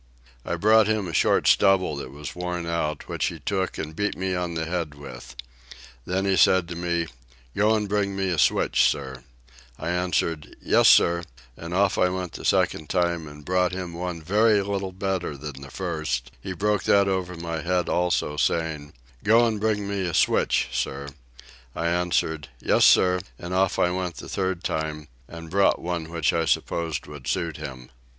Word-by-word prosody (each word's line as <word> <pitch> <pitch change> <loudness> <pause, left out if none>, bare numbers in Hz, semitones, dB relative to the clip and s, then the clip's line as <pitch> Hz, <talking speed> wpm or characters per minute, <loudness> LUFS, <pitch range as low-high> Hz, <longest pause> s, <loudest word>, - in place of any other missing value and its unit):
I - - -2
brought 110 +1 +5
him 110 -3 0
a 85 - -6
short - - +3
stubble 95 -5 +4
that 70 - -6
was 70 +2 -8
worn 90 -1 -3
out, 85 -2 -2
which - - -2
he - - -3
took 95 -2 -2
and 80 0 -5
beat 105 +3 -1
me 95 0 -1
on 90 -2 -2
the 80 0 -2
head 85 -3 -3
with. 65 -3 -10 0.7
Then 95 +2 0
he 95 -1 +2
said 95 -2 +4
to 85 - -5
me, 85 -1 -1 0.5
"Go 105 +2 +3
and 105 -1 -1
bring 100 -1 0
me 95 -1 -1
a 85 -3 0
switch, - - +3
sir;" 65 -3 -5 0.5
I 80 - -4
answered 85 -3 -1
"Yes, - - +4
sir;" 85 0 +5 0.3
and 85 +5 -8
off 100 0 +2
I 90 - +4
went 90 -1 -4
the - - -8
second 75 - +1
time, 85 -3 0
and 75 0 -12
brought 90 0 +1
him 90 -2 -5
one 85 -1 -5
very 105 +4 +3
little 100 -1 -3
better 95 -5 -3
than 70 -1 -8
the 70 - -9
first; 80 -9 -3
he 95 - -5
broke 105 +2 0
that 100 -1 +4
over 95 -2 -1
my 85 -1 -4
head 90 +1 0
also, 85 -4 0
saying, 80 -2 -1 0.3
"Go 115 +3 +5
and 110 -2 -1
bring 105 -1 0
me 100 -2 -2
a 85 - -2
switch, - - +2
sir;" 70 +1 -3 0.7
I 85 - -2
answered, 85 -3 0
"Yes, - - +3
sir," 90 0 +5 0.2
and 90 +1 -6
off 95 0 +2
I 90 - +2
went 90 -2 -3
the - - -9
third 95 -2 -2
time, 75 -1 -3 0.2
and 85 -1 -10
brought 100 +1 +3
one 85 -2 -4
which 85 -3 0
I 80 -1 +1
supposed 80 0 -1
would 75 -4 -10
suit 85 -3 -1
him. 65 -5 -8
90 Hz, 185 wpm, -25 LUFS, 80-95 Hz, 0.7 s, brought